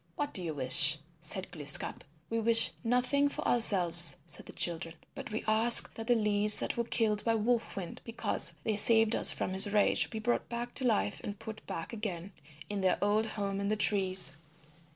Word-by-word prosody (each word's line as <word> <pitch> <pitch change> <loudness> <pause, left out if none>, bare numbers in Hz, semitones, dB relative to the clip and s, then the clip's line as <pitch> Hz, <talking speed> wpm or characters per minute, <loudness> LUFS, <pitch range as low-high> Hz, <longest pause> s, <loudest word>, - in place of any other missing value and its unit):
"What 290 - -5
do 185 - -4
you 160 -3 -6
wish?" 145 +3 +8 0.2
said 175 +4 -7
Glooskap. 145 -3 -2 0.2
"We 230 +6 -3
wish 230 0 +2
nothing 250 +4 0
for - - -5
ourselves," 175 -7 +2
said 165 - -4
the - - -9
children, 165 -1 -5 0.2
"but - - -9
we 220 0 -6
ask 225 +2 +4
that 225 0 -9
the 245 - +2
leaves 210 -1 +5
that - - -3
were 235 - -3
killed 215 -3 -1
by 230 -1 0
Wolf 230 +2 -2
Wind 185 -3 -8
because 230 0 -3
they 215 -2 -3
saved 225 +1 +2
us - - +6
from 185 - -3
his 195 +2 +5
rage 210 -1 +2
be 220 - -8
brought 240 +2 -3
back 240 +1 -6
to 265 - -3
life 210 -3 -2
and 205 0 -7
put 220 +1 -11
back 165 +7 -7
again 200 -4 -7 0.4
in 205 -1 -5
their 185 -1 0
old 210 +2 -1
home 200 -2 -5
in 200 - -4
the 215 - -1
trees." 190 -6 +1
210 Hz, 195 wpm, -29 LUFS, 185-230 Hz, 0.4 s, wish